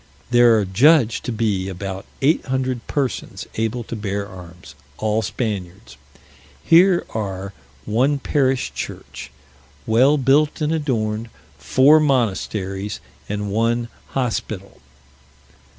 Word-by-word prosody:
There 120 -2 +6
are 105 - +1
judged 120 - +3
to - - -2
be 105 -4 -1
about 95 +1 -6 0.2
eight 155 +5 +3
hundred 130 -2 -2
persons 140 -4 -3
able 115 +2 -2
to 115 - -6
bear 100 -2 -3
arms, 90 -4 -12 0.2
all 110 0 0
Spaniards. 100 -2 -4 0.7
Here 175 +2 +5
are 100 -2 -4 0.3
one 130 +7 +2
parish 135 -2 0
church, - - -7 0.6
well 130 +7 +4
built 145 +3 +2
and 155 0 0
adorned, 115 -7 -1 0.3
four 130 - +5
monasteries, 105 -7 -1 0.3
and 105 0 -3
one 115 +2 0 0.2
hospital. 110 -6 -4
115 Hz, 110 wpm, -21 LUFS, 100-130 Hz, 0.7 s, There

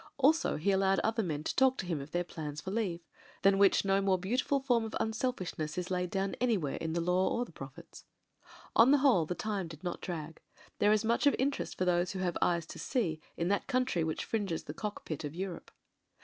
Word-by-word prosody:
Also, 295 +4 +3
he 175 +7 +1
al 190 - +3
lowed 195 0 +3
other 225 +1 +1
men 155 -6 -3
to - - -2
talk 265 0 +4
to - - -3
him 165 -5 -2
of 140 - -9
their 175 +2 0
plans 150 -4 -6
for 190 - -5
leave: 195 -6 -1 0.4
than 195 0 +5
which 200 0 +5
no 195 0 +3
more 195 -1 +3
beautiful 250 +9 0
form 245 -4 +2
of 220 - -5
unselfishness 220 -9 -2
is 180 0 -3
laid 180 -1 0
down 195 +1 -1
an3rwhere 210 - +1
in 160 -1 -3
the 170 - 0
Law 180 +2 +2
or 245 - -1
the - - -15
Prophets. - - -11 0.7
On 230 +3 +7
the 290 - +6
whole 250 - +4
the 180 - -2
time 205 -4 -2
did 160 0 -11
not 175 -1 -4
drag. 165 -3 -6 0.4
There 205 - +4
is 215 +1 +2
much 235 +5 +2
of 285 - +5
interest 275 +2 -1
for 185 - 0
those 175 +1 +1
who 190 - -4
have 175 -2 -1
eyes 170 -2 +2
to - - -9
see 170 - -1 0.2
in 170 +1 0
that 200 - 0
coun 255 -2 +2
try 180 -10 -1
which 160 -1 -2
fringes 200 -7 -2
the 150 - -7
Cock 210 +4 -5
Pit 155 -2 -4
of 150 +1 -5
Europe. 185 -1 -5
190 Hz, 235 wpm, -32 LUFS, 170-225 Hz, 0.7 s, On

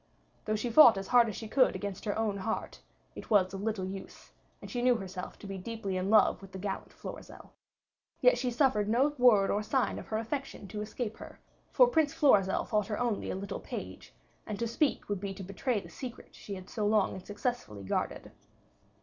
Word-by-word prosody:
Though 215 - 0
she 235 +3 -2
fought 240 -5 +8
as 195 0 -5
hard 240 -2 +5
as 210 - -5
she 220 - -6
could 255 +4 +3
against 200 -1 -5
her 205 -1 -1
own 215 -3 0
heart, 220 +3 -4 0.3
it - - -10
was 195 -3 +3
of 195 - -5
little 210 -3 -2
use, 190 +1 -9 0.3
and - - -10
she 245 - -2
knew 250 0 +4
herself 190 -4 -6
to - - -12
be 195 -1 -5
deeply 200 -1 -4
in 185 +1 -1
love 215 -1 +4
with 195 -1 -13
the - - -5
gallant 195 +1 -5
Florizel. - - -10 0.7
Yet - - +5
she 250 - 0
suffered 235 -5 +2
no 255 +6 +3
word 215 -6 +5
or 205 - +1
sign 260 +4 0
of - - -10
her 215 - -1
affection 230 -1 -4
to 210 +2 -5
escape 215 +1 -4
her, - - -11 0.3
for - - +7
Prince 320 - +1
Florizel 200 -10 +4
thought 210 -3 0
her 210 - -2
only 240 -4 -1
a - - -2
little 195 +1 -5
page, - - -8 0.4
and 210 - -4
to 235 - -1
speak 275 +5 0
would 205 -2 -2
be 195 0 -5
to 195 - -7
betray 210 +5 -1
the - - -12
secret 250 -2 -8
she 200 - -8
had 185 -1 -10
so 210 -3 -2
long 210 -2 +2
and 190 - -8
successfully 205 - -4
guarded. 95 - -3
210 Hz, 215 wpm, -30 LUFS, 195-240 Hz, 0.7 s, fought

